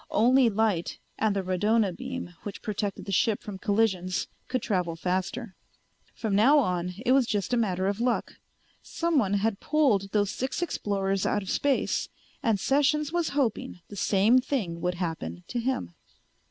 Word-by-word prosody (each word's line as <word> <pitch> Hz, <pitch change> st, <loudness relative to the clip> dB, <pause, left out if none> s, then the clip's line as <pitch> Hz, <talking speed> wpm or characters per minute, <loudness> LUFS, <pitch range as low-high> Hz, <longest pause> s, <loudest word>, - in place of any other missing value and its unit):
Only 245 Hz, +3 st, +4 dB
light 210 Hz, -5 st, 0 dB, 0.2 s
and 215 Hz, -2 st, +2 dB
the 195 Hz, -, -1 dB
radona 195 Hz, +1 st, +1 dB
beam 255 Hz, -8 st, -6 dB
which 205 Hz, -, -8 dB
protected 205 Hz, -2 st, -3 dB
the 200 Hz, -, -5 dB
ship 210 Hz, +3 st, +1 dB
from 200 Hz, -3 st, -7 dB
collisions 190 Hz, -3 st, 0 dB, 0.2 s
could 255 Hz, -3 st, -2 dB
travel 180 Hz, -5 st, -1 dB
faster. 185 Hz, +5 st, -3 dB, 0.6 s
From 220 Hz, -3 st, -2 dB
now 255 Hz, +9 st, +6 dB
on 180 Hz, -8 st, 0 dB
it 250 Hz, -, +3 dB
was 260 Hz, -2 st, +4 dB
just 210 Hz, +2 st, -1 dB
a -, -, +5 dB
matter 190 Hz, -5 st, 0 dB
of 200 Hz, +2 st, -1 dB
luck. 245 Hz, 0 st, -1 dB, 0.4 s
Someone 280 Hz, -, 0 dB
had 205 Hz, 0 st, 0 dB
pulled 245 Hz, -11 st, +2 dB
those 205 Hz, -2 st, +1 dB
six 265 Hz, +7 st, -2 dB
explorers 195 Hz, -, -1 dB
out 205 Hz, -, 0 dB
of 190 Hz, -, -4 dB
space 280 Hz, -2 st, 0 dB, 0.3 s
and 225 Hz, -7 st, +1 dB
Sessions 290 Hz, -, +2 dB
was 345 Hz, -2 st, +1 dB
hoping 235 Hz, -8 st, -1 dB
the 205 Hz, -, -9 dB
same 205 Hz, +5 st, +4 dB
thing 205 Hz, -11 st, -2 dB
would 180 Hz, 0 st, -1 dB
happen 160 Hz, -, -4 dB
to 245 Hz, -, -2 dB
him. 255 Hz, +2 st, -2 dB
210 Hz, 165 wpm, -27 LUFS, 190-255 Hz, 0.6 s, now